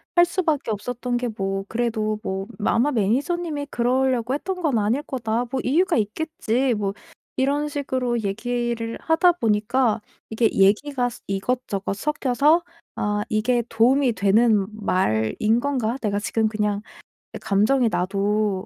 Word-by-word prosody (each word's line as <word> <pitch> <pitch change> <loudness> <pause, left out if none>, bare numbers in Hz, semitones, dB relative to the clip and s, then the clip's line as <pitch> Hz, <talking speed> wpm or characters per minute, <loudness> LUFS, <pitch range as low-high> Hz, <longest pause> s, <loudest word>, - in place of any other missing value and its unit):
할 345 0 +7
수 365 +2 -2
밖에 295 -8 0
없었던 245 +3 -3
게 245 0 -2
뭐 195 -1 -2
그래도 220 -2 -1
뭐 190 0 -3 0.2
'아마 255 +6 +2
매니저님이 285 - -1
그러려고 250 0 +1
했던 365 +6 -3
건 295 -8 +1
아닐 220 +6 +1
거다. 235 -3 -2
뭐 265 - -1
이유가 330 +9 +2
있겠지.' 250 +2 0
뭐 200 -2 -2 0.4
이런 285 +3 +1
식으로 260 -4 -1
얘기를 230 +2 -2
하다 340 +3 +4
보니까 225 -3 +1 0.3
이게 225 0 +2
얘기가 245 +7 +2
스 240 - -12
이것저것 200 0 -2
섞여서 290 - +2 0.4
'아 210 0 0
이게 235 +3 +1
도움이 245 +3 +3
되는 205 +1 +3
말인 190 - +1
건가? 255 -4 -1
내가 205 -2 0
지금 220 +1 0
그냥 210 -1 -1 0.5
약간 195 - -2
감정이 245 +2 +3
나도 200 +1 0
235 Hz, 290 characters per minute, -23 LUFS, 210-265 Hz, 0.5 s, 할